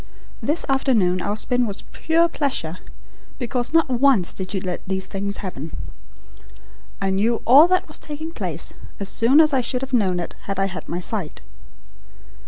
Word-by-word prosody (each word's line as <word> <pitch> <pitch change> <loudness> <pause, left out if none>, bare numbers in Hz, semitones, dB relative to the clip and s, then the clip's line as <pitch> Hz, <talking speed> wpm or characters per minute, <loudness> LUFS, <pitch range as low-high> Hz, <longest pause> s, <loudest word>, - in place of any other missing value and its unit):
This 305 +4 +1
afternoon 220 -10 +2
our 205 +3 -2
spin 245 +1 +1
was 200 -1 -5
pure 330 +1 +2
pleasure, 220 - -1 0.6
because 245 -1 -2
not 325 0 +4
once 255 -7 +3
did 185 -1 -6
you 200 - -1
let 180 -1 -4
these 190 0 -2
things 200 0 -4
happen. 160 -4 -6 1.2
I 195 -1 0
knew 220 +4 +1
all 280 +7 +8
that 370 +1 +1
was - - -3
taking 315 +2 -6
place, - - -4 0.3
as 200 -1 -3
soon 250 +6 +4
as 310 -2 +5
I 265 - +3
should 250 +1 -2
have 270 0 -6
known 190 -7 +2
it 175 - -5
had 195 -1 -3
I 195 - +2
had 190 -1 -6
my 175 - -2
sight." 180 -3 -3
230 Hz, 175 wpm, -22 LUFS, 190-275 Hz, 1.2 s, all